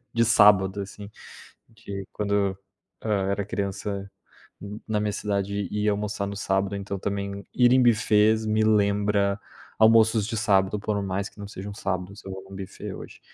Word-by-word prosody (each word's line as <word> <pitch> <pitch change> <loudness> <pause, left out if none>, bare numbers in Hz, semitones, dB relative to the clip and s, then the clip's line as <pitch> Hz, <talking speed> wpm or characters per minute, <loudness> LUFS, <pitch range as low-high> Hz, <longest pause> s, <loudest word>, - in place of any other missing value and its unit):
de 115 0 +3
sábado 105 -3 +5
assim. 100 +1 -8 0.6
De 100 -4 -8
quando, 100 -2 0 0.5
hã, 100 -3 0
era 100 0 -1
criança, 100 0 -4 0.5
n 105 +2 -8
na 105 -1 0
minha 105 0 0
cidade 100 -1 -2
ia 105 0 +1
almoçar 100 0 -2
no 100 - -5
sábado. 95 0 0
Então 100 0 -4
também, 100 0 -4
ir 125 -1 +4
em 130 - +5
buffets 110 -1 +3
me 110 0 +2
lembra, 100 -1 +2 0.4
almoços 110 -1 +5
de 115 - -3
sábado, 100 -2 +2
por 105 0 -1
mais 95 +1 -2
que - - -30
não 100 - -6
sejam 100 0 -7
sábados, 95 0 -4
eu 95 - -6
vou 95 0 -7
no 95 - -10
buffet 95 -1 -7
hoje. - - -10
100 Hz, 165 wpm, -25 LUFS, 100-105 Hz, 0.6 s, sábado